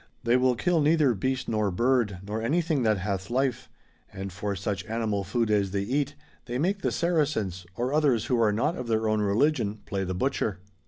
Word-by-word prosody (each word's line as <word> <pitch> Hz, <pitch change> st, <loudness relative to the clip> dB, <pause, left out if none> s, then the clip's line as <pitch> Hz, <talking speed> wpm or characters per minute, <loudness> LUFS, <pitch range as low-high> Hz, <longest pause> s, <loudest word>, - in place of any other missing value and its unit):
They 120 Hz, 0 st, +3 dB
will 125 Hz, 0 st, +3 dB
kill 170 Hz, +6 st, +1 dB
neither 150 Hz, -3 st, +4 dB
beast 130 Hz, +5 st, -2 dB
nor 110 Hz, -2 st, +1 dB
bird, 115 Hz, -2 st, +1 dB
nor 105 Hz, +2 st, -3 dB
any 145 Hz, +10 st, +1 dB
thing 155 Hz, -4 st, 0 dB
that 110 Hz, -3 st, +2 dB
hath 95 Hz, 0 st, -3 dB
life; 130 Hz, +1 st, -1 dB, 0.4 s
and 95 Hz, -1 st, -6 dB
for 100 Hz, +1 st, -3 dB
such 95 Hz, 0 st, -3 dB
animal 110 Hz, -2 st, -1 dB
food 110 Hz, +4 st, 0 dB
as 100 Hz, -2 st, +2 dB
they 100 Hz, +1 st, -1 dB
eat, 140 Hz, +6 st, -1 dB, 0.3 s
they 120 Hz, 0 st, -3 dB
make 190 Hz, +8 st, 0 dB
the -, -, 0 dB
Saracens, 140 Hz, -, 0 dB
or 125 Hz, +5 st, -1 dB
others 140 Hz, -7 st, +2 dB
who 125 Hz, -3 st, +1 dB
are 110 Hz, -2 st, +4 dB
not 115 Hz, +11 st, 0 dB
of 125 Hz, -, -5 dB
their 110 Hz, -1 st, +1 dB
own 110 Hz, 0 st, +1 dB
religion, 110 Hz, 0 st, +1 dB
j)lay 95 Hz, -1 st, -2 dB
the 95 Hz, -, -2 dB
butcher. 105 Hz, -2 st, -1 dB
115 Hz, 205 wpm, -27 LUFS, 100-135 Hz, 0.4 s, neither